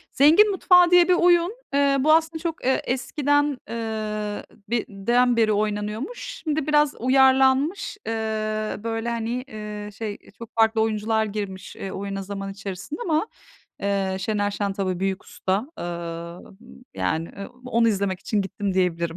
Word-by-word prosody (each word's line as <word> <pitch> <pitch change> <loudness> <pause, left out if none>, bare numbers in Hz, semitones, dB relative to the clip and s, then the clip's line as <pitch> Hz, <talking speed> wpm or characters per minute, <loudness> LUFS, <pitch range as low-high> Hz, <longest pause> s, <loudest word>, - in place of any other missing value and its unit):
"Zengin 330 +10 +6
Mutfağı" 360 -2 +5
diye 355 -1 +6
bir 365 - +6
oyun. 350 +2 +4 0.2
Iıı, 280 -1 +3
bu 310 - +5
aslında 320 0 +2
çok, 330 -2 -4
ııı, 265 - +3
eskiden, 290 +2 +1
ııı, 215 -2 -3 0.5
den 240 +5 +2
beri 220 -2 +3
oynanıyormuş. 210 - -2 0.3
Şimdi 310 -2 -1
biraz 300 -1 +3
uyarlanmış. 265 - +3
Iıı, 215 -1 -2
böyle, 225 0 -2
hani, 235 +2 -2
ııı, 210 -1 -6
şey, 210 0 -5 0.2
çok 230 0 -10
farklı 225 0 +3
oyuncular 220 0 +1
girmiş, 200 -3 -6
ııı, 195 - -5
oyuna 195 0 -4
zaman 195 0 -5
içerisine 195 +7 -6
ama 320 +4 +1 0.6
Iıı, 195 -1 0
Şener 205 +1 0
Şen 200 -1 -2
tabii 190 -2 -2
Büyük 195 0 -1
Usta. 190 +1 -1 0.2
Imm, 170 +7 -7
yani, 160 +1 -1
e, 200 0 -8 0.2
onu 235 -2 +3
izlemek 195 -3 -1
için 210 -2 0
gittim 195 0 -3
diyebilirim. 170 -3 0
220 Hz, 145 wpm, -24 LUFS, 200-270 Hz, 0.6 s, Zengin